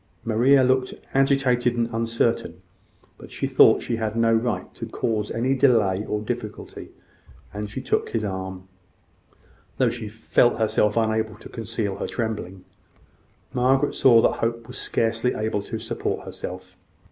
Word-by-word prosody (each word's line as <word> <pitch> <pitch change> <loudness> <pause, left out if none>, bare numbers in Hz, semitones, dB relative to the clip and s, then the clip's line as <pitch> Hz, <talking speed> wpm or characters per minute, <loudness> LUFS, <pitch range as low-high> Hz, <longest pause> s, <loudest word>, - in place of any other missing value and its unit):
Maria 125 +5 +4
looked 130 0 +1 0.2
agitated 135 -3 +2
and 120 -1 0
uncertain; 115 -6 0 0.6
but - - -12
she - - -3
thought - - +5
she 115 - -2
had 110 -1 -2
no 115 0 +3
right 115 0 -1
to - - -7
cause 105 -2 -2
any 125 +4 0
delay 110 -8 +3
or 105 - -1
difficulty; 110 -1 -6 0.6
and 105 0 -5
she 110 - -5
took - - -1
his 110 -2 -2
arm, 95 -1 -5 1.1
though - - +3
she 110 - -6
felt 110 +2 +2
herself 110 -1 +1
unable 110 -1 0
to 105 - -12
conceal 110 -3 -4
her - - -3
trembling. 100 -5 -4 0.9
Hope 130 +3 +2
saw 115 -3 +5
that - - +4
Margaret 115 0 -1
was 125 - -7
scarcely 115 +2 0
able 110 -1 -1
to 110 +3 -5
support 110 +1 -3
herself. 90 0 -8
115 Hz, 145 wpm, -24 LUFS, 105-120 Hz, 1.1 s, thought